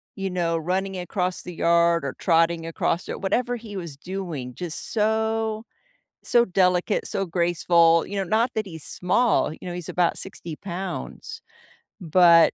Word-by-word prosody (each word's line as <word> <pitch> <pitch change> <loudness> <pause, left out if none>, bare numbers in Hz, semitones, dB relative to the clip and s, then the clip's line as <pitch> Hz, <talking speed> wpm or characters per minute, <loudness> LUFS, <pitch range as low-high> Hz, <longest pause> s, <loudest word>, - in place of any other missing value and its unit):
you 195 -1 -3
know, 170 -2 0
running 190 +3 -2
across 180 0 -2
the 180 - -7
yard 170 -1 +3
or 135 - -4
trotting 165 -1 +2
across 165 +1 -1
it, - - -5
whatever 245 +5 0
he 215 -3 -8
was 170 -6 -6
doing, 165 -8 -5
just 175 -3 -5
so 220 0 0 0.6
so 240 -1 +4
delicate, 180 +1 +1
so 195 - -1
graceful. 170 -1 +3
You 200 - -5
know, 195 - +1
not 225 +5 +2
that 215 -1 -1
he's 160 -4 -7
small. 185 -1 +1
You 180 - -10
know, - - -4
he's 175 -2 -6
about 175 -2 +1
60 170 -4 -7
pounds, 195 - -6 0.6
but 170 0 +6
180 Hz, 160 wpm, -24 LUFS, 170-200 Hz, 0.6 s, but